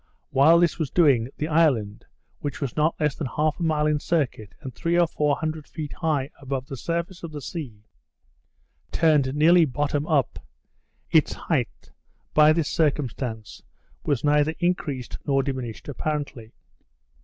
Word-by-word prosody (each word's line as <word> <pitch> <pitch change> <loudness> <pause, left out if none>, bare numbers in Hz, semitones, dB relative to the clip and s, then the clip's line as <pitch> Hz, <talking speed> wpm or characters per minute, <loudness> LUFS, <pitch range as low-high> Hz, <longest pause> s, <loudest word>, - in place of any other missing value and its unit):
While 155 +5 +6
this 175 -1 +2
was 155 -4 -1
doing, 135 -9 +3
the 150 - -2
island, 135 -11 +1 0.3
which 145 -2 -4
was 135 -5 -3
not 155 +2 +1
less 150 -2 +1
than 150 - -4
half 150 +5 -1
a - - -2
mile 155 -2 +1
in 150 -1 +2
circuit, 130 - -2
and 130 - -8
three 170 +6 0
or 175 - +5
four 150 -3 0
hundred 155 -1 -4
feet 150 -3 -6
high 155 -5 -1
above 135 -1 -4
the 135 - -7
surface 170 +5 -3
of 170 - -7
the 150 - -6
sea, 130 - -7 1.1
turned 150 -5 +2
nearly 165 +3 +6
bottom 145 +1 -1
up. 140 - +1 0.7
Its - - +4
height, - - -3 0.4
by 150 0 +6
this 155 -2 +1
circumstance, 130 - -2 0.4
was 140 -4 0
neither 150 +1 +2
increased 165 -8 -2
nor 135 -1 +2
diminished 130 -5 -5
apparently. 145 -5 -4
150 Hz, 155 wpm, -24 LUFS, 135-160 Hz, 1.1 s, While